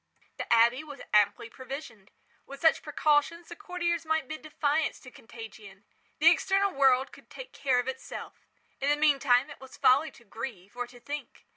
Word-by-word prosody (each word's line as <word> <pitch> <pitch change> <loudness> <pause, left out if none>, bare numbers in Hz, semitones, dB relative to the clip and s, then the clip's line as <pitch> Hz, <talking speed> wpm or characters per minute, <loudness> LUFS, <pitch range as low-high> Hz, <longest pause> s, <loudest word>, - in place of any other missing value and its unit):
The - - -6
abbey 235 +4 +4
was 290 -4 -10
amply 210 +2 +3
provisioned. 255 -5 -9 0.4
With 275 0 -10
such 320 +1 +4
precautions 305 +3 +1
the 345 - -8
courtiers 345 -4 -2
might 320 0 -1
bid 310 0 -7
defiance 300 0 -1
to 255 - -13
contagion. 220 -4 -12 0.3
The 325 +3 +7
external 390 +3 +2
world 265 -1 +3
could - - -17
take - - -10
care 265 -3 +1
of 245 +1 0
itself. 265 0 -7 0.3
In 275 - 0
the 290 - +4
meantime 275 -4 +3
it - - -12
was 265 - -12
folly 280 +5 +4
to 240 - -19
grieve, 220 -3 -8
or 245 0 -4
to 245 0 -15
think. 290 +4 -8
275 Hz, 175 wpm, -29 LUFS, 245-310 Hz, 0.4 s, The